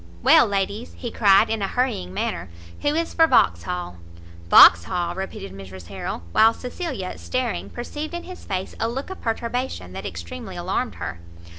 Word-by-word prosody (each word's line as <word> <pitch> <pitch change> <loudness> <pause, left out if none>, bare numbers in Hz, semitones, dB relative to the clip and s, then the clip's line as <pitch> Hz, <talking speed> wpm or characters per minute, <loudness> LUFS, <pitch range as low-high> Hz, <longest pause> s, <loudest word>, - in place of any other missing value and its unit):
"Well, - - +7
ladies," 200 +3 -2
he 240 - -5
cried 200 -3 +5
in 225 -2 -1
a 195 - 0
hurrying 245 - -1
manner, 90 -1 -3 0.3
"who 290 +1 +1
is 330 +1 -1
for 325 -1 +5
Vauxhall?" 90 - +1 0.5
"Vauxhall!" 170 - +7
repeated 195 +2 -6
Mrs 95 -2 -11
Harrel, 95 -3 -5
while 225 - +5
Cecilia, 250 - -5
staring, 255 -3 -2
perceived 295 +7 -6
in 345 - -5
his 370 0 -10
face 190 -2 -4
a 225 - 0
look 270 +9 -5
of 380 - -8
perturbation 230 - -3
that 95 +2 -5
extremely 85 -1 -7
alarmed - - -2
her. 85 - -6
200 Hz, 160 wpm, -23 LUFS, -, 0.5 s, Well